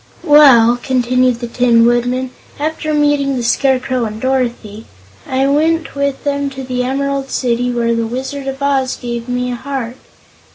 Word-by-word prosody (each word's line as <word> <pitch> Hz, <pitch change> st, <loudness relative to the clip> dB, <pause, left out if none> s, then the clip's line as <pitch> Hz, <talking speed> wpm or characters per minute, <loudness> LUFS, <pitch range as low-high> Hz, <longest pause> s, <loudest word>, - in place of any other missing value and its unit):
"Well," 250 Hz, -6 st, +6 dB
continued 255 Hz, -1 st, +1 dB
the 240 Hz, -, -3 dB
Tin 235 Hz, -1 st, +3 dB
Woodman, 245 Hz, +2 st, 0 dB, 0.3 s
"after 310 Hz, +1 st, -2 dB
meeting 290 Hz, -2 st, +1 dB
the 245 Hz, -, -3 dB
Scarecrow 255 Hz, 0 st, +1 dB
and 215 Hz, 0 st, -6 dB
Dorothy, 240 Hz, -4 st, -2 dB, 0.4 s
I 265 Hz, +1 st, 0 dB
went 320 Hz, +4 st, +1 dB
with 280 Hz, -1 st, -2 dB
them 280 Hz, -1 st, -1 dB
to 270 Hz, -1 st, -8 dB
the 250 Hz, -1 st, -3 dB
Emerald 275 Hz, +1 st, -2 dB
City, 245 Hz, 0 st, -1 dB
where 235 Hz, -1 st, 0 dB
the 230 Hz, -1 st, -1 dB
Wizard 270 Hz, +3 st, -5 dB
of 270 Hz, +1 st, -4 dB
Oz 270 Hz, -2 st, 0 dB
gave 235 Hz, -1 st, -6 dB
me 250 Hz, 0 st, -2 dB
a -, -, -3 dB
heart. 255 Hz, -1 st, -5 dB
255 Hz, 160 wpm, -15 LUFS, 240-280 Hz, 0.4 s, Well